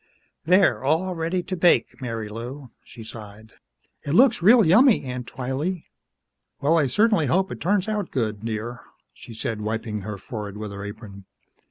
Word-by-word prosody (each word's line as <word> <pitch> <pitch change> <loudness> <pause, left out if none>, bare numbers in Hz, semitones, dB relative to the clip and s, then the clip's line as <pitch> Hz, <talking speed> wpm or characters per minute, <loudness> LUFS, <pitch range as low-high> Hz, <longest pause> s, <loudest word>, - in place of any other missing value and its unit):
"There 180 -1 +4
all 165 +7 +1
ready 170 +2 -2
to 185 +1 -4
bake, 175 -4 +2
Marilou," 115 +3 -6
she 115 - -12
sighed. 110 -1 -11 0.5
"It 145 - -3
looks 240 +1 +5
real 220 +4 +6
yummy, 220 - +5
Aunt 125 -2 -6
Twylee." 145 +8 -3 0.7
"Well, 150 +4 +2
I 155 -4 +3
certainly 210 - +2
hope 190 +7 +1
it - - -7
turns 195 +1 +1
out 210 -4 -2
good, 110 -5 -2
dear," 115 +1 -4 0.3
she 115 - -12
said, 110 -1 -4
wiping 110 0 -3
her 105 +1 -6
forehead 105 -1 -7
with 105 -1 -6
her 100 0 -7
apron. 100 -1 -9
130 Hz, 160 wpm, -24 LUFS, 110-180 Hz, 0.7 s, real